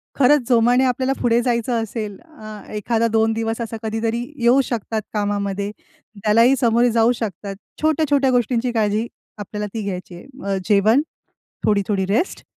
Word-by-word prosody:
खरंच 275 -1 +4
जोमाने 245 +2 +4
आपल्याला 260 +1 0
पुढे 235 0 +3
जायचं 235 -1 0
असेल 215 -2 -5
अ, 215 -11 -11
एखादा 225 +2 0
दोन 225 0 +2
दिवस 225 +1 -2
असा 225 0 -4
कधीतरी 225 +1 -1 0.2
येऊ 245 +3 +5
शकतात 225 -1 -2
कामामध्ये. 205 -1 -2 0.5
त्यालाही 230 +5 +5
सामोरे 240 -1 +3
जाऊ 230 +1 +3
शकतात. 200 -2 -5 0.3
छोट्या-छोट्या 295 -3 +2
गोष्टींची 245 0 +1
काळजी 220 0 0 0.3
आपल्याला 210 +1 -5
ती 225 - -3
घ्यायची 185 -2 -5
आहे. 175 - -12 0.2
अ, 195 -1 0
जेवण, 215 +6 +4 0.6
थोडी-थोडी 200 -1 +1
रेस्ट 220 - -1
225 Hz, 145 wpm, -21 LUFS, 210-245 Hz, 0.6 s, येऊ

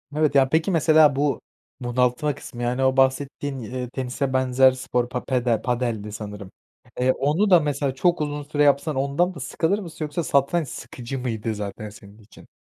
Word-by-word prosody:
Evet, 150 -2 +1
ya, 135 -1 +5
peki, 160 +5 +1
mesela 155 -3 +5
bu 145 +1 0 0.4
bunaltma 125 +4 0
kısmı, 120 -3 -8
yani, 125 +2 0
o 130 0 +2
bahsettiğin, 135 +1 0
eee, 125 +2 -5
tenise 130 +1 -3
benzer 130 0 +4
spor 125 -1 -2
pa 125 0 -4
pedel 125 -4 0
padeldi 120 -4 -2
sanırım. 105 -2 -8 0.5
Eee, 125 +1 +3
onu 150 +11 +1
da 180 -2 +7
mesela 145 -3 -1
çok 175 +4 +1
uzun 145 -1 -3
süre 150 0 0
yapsan 145 +1 +2
ondan 140 +7 0
da 155 - -10
sıkılır 165 +8 -1
mısın 165 -5 -6
yoksa 150 +3 -3
satranç 145 +3 +1
sıkıcı 130 +1 -7
mıydı 115 -3 -3
zaten 105 +1 -6
senin 100 0 -15
için? 105 -1 -17
135 Hz, 175 wpm, -23 LUFS, 125-150 Hz, 0.5 s, da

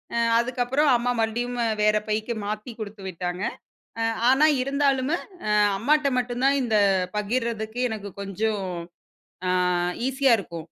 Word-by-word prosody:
அ - - 0 0.2
அதுக்கப்புறம் 255 +4 +1
அம்மா 245 +1 0
மறுபடியும் 240 +2 -1 0.3
வேற 215 0 +4
பைக்கு 215 +2 -1
மாத்தி 215 +3 -4
குடுத்துவிட்டாங்க. 190 -3 -5 0.9
ஆனா 275 +4 +5 0.2
இருந்தாலுமே 275 +2 +1 0.3
அ - - +1 0.3
அம்மாட்ட 290 +5 +2
மட்டும் 245 0 -2
தான் 280 +1 +4
இந்தப் 200 -5 +2
பகிர்றதுக்கு 225 +1 -2
எனக்குக் 200 -3 -7
கொஞ்சம் 200 0 -2 0.8
ஆ - - +2 0.6
ஈசியா 265 -2 +3
இருக்கும். 170 -3 -7
230 Hz, 120 wpm, -25 LUFS, 205-255 Hz, 0.9 s, ஆனா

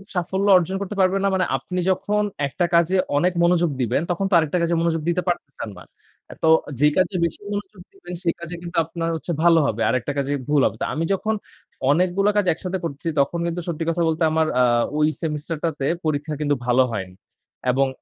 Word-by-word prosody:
সাফল্য 190 +3 -1
অর্জন 180 +2 -1
করতে 200 +1 -4
পারবে 190 +1 +3
না - - +3
মানে, 185 -1 +2
আপনি 180 +8 -5
যখন 210 +3 0 0.2
১ 140 - -6
টা 175 - +4
কাজে 170 +2 +3 0.2
অনেক 180 +4 +2
মনোযোগ 175 -1 +3
দিবেন, 125 +4 +1
তখন 185 +3 -1
তো 190 - -2
আরেকটা 160 +1 +1
কাজে 170 0 +1
মনোযোগ 165 -1 0
দিতে 180 +1 +1
পারতেছেন 140 -9 -3
না। - - -11 0.5
আ - - -7
তো - - +4 0.3
যে 150 - +6
কাজে 185 +1 +2
বেশি 170 - -4
মনোযোগ 205 -2 -6
দিবেন, 390 - -10
সেই 170 - +1
কাজে 170 +1 -6
কিন্তু 175 0 -6
আপনার 165 0 -3
হচ্ছে 165 +2 -4
ভালো 165 -1 +6
হবে। 115 +1 -2
আরেকটা 130 +3 0
কাজে 140 0 -1 0.2
ভুল 145 -2 +3
হবে। - - 0
তো - - +1
আমি 160 - -1
যখন 220 +3 -1 0.6
অনেকগুলো 185 +5 +2
কাজ 205 - +3
একসাথে 185 +3 -4
করতেসি, 165 +1 -4
তখন 170 +5 -1
কিন্তু 170 +1 -3
সত্যি 165 -1 -2
কথা 170 +1 0
বলতে 160 +1 0
আমার 160 0 +2
আ - - +5 0.3
ওই 150 0 +3
সেমিস্টারটাতে 155 -1 -3 0.2
পরীক্ষা 150 0 -1
কিন্তু 145 -1 +1
ভালো 125 +1 +4
হয়নি। 95 -4 -5 0.6
এবং 135 +1 +2
170 Hz, 205 wpm, -22 LUFS, 150-180 Hz, 0.6 s, যে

